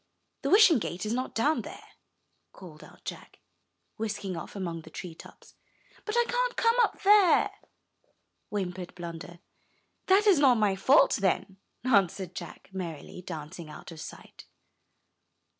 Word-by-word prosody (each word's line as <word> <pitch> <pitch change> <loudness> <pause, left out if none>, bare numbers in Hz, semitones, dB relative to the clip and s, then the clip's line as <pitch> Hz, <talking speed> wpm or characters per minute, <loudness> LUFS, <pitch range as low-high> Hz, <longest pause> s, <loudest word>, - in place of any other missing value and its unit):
the - - -1
Wishing 395 - +7
Gate 185 -1 -4
is 215 - -1
not 255 +2 -3
down 295 +8 +2
there," - - -11 0.6
called 160 -5 -12
out - - -17
Jack, - - -8 0.6
whisking 205 -4 -3
off 165 - -8
among 170 -4 -4
the - - -13
treetops. 170 -3 -11 0.5
"But 430 - -3
I 475 - +4
can't - - -1
come 460 0 +3
up - - 0
there," 400 -3 +5 1.0
whimpered 185 -3 -4
Blunder. 170 0 -8 0.7
"That 390 +3 +5
is 390 -7 +5
not 265 -4 +6
my 210 -3 +2
fault, 260 +10 +4
then," 195 -1 -1 0.3
answered 195 -6 +1
Jack, 175 +2 -9
merrily, 175 -2 -6
dancing 165 -1 -8
out 150 - -10
of 160 -2 -9
sight. - - -11
195 Hz, 140 wpm, -28 LUFS, 175-290 Hz, 1.0 s, Wishing